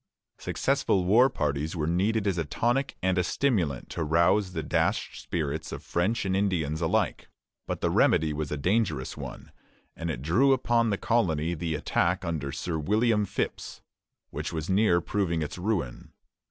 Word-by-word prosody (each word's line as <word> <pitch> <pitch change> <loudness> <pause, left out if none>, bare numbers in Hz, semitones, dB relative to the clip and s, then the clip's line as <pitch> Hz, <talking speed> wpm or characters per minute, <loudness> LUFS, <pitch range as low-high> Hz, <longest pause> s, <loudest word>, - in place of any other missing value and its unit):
Successful 90 -2 0
war 120 +8 +5
parties 75 - -2
were 75 -3 -1
needed 100 +6 +1
as 95 -4 0
a - - +1
tonic 120 - 0
and 95 0 +2
a - - +2
stimulant 90 - 0
to 85 - -2
rouse 85 +5 +2
the - - -3
dashed - - -1
spirits 75 -5 -3
of - - -6
French 100 +6 0
and 95 -1 0
Indians 85 -6 0
alike; 80 - 0 0.4
but - - -3
the - - +1
remedy 80 -1 +3
was 75 0 -4
a 75 - -1
dangerous 90 - 0
one, - - -8 0.4
and 85 0 -4
it 65 -5 -4
drew 125 - +4
upon 120 -3 +2
the 100 - 0
colony 85 -9 +1
the 80 -1 -2
attack 90 +4 0
under 75 -5 -3
Sir 80 +3 -3
William 105 +5 +2
Phips, - - -4 0.5
which 75 +2 -4
was 80 +2 -3
near 95 -3 +3
proving 85 -3 -1
its 75 - -6
ruin. 90 - -2
85 Hz, 165 wpm, -27 LUFS, 80-105 Hz, 0.5 s, war